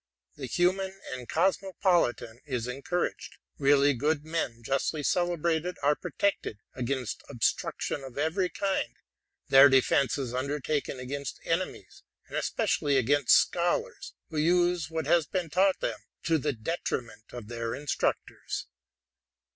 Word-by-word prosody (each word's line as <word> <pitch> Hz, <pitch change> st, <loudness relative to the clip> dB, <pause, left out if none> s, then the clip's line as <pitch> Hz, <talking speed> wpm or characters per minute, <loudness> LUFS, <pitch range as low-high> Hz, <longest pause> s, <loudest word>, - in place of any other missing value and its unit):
The 135 Hz, -3 st, -6 dB
human 190 Hz, +5 st, 0 dB
and 125 Hz, -2 st, -7 dB
cosmopolitan 175 Hz, -, +1 dB
is 125 Hz, -4 st, -2 dB
encouraged: 140 Hz, +8 st, -3 dB, 0.2 s
really 140 Hz, 0 st, +5 dB
good 150 Hz, +4 st, 0 dB
men 145 Hz, -8 st, -3 dB
justly 135 Hz, +4 st, -1 dB
celebrated 175 Hz, +1 st, 0 dB
are 145 Hz, +1 st, +5 dB
protected 200 Hz, -, -1 dB, 0.2 s
against 125 Hz, -1 st, -3 dB
obtrusion 135 Hz, +2 st, -1 dB
of 135 Hz, -1 st, -10 dB
every 165 Hz, +5 st, +1 dB
kind: 195 Hz, 0 st, -1 dB, 0.5 s
their 135 Hz, +1 st, +9 dB
defence 135 Hz, +1 st, +3 dB
is 130 Hz, -4 st, -4 dB
undertaken 140 Hz, +1 st, -2 dB
against 140 Hz, +1 st, -5 dB
enemies, 165 Hz, -, -3 dB, 0.3 s
and -, -, -8 dB
especially 140 Hz, -2 st, +1 dB
against 140 Hz, +2 st, +4 dB
scholars 175 Hz, 0 st, 0 dB, 0.2 s
who 155 Hz, -, -4 dB
use 175 Hz, 0 st, +2 dB
what 160 Hz, -2 st, -3 dB
has 160 Hz, 0 st, +3 dB
been 175 Hz, -3 st, -2 dB
taught 190 Hz, +2 st, +3 dB
them -, -, -2 dB, 0.2 s
to 165 Hz, -1 st, +2 dB
the 145 Hz, +1 st, -1 dB
detriment 115 Hz, -4 st, -4 dB
of 120 Hz, -4 st, -8 dB
their 115 Hz, 0 st, -3 dB
instructors. 145 Hz, +1 st, -2 dB
145 Hz, 125 wpm, -29 LUFS, 130-175 Hz, 0.5 s, their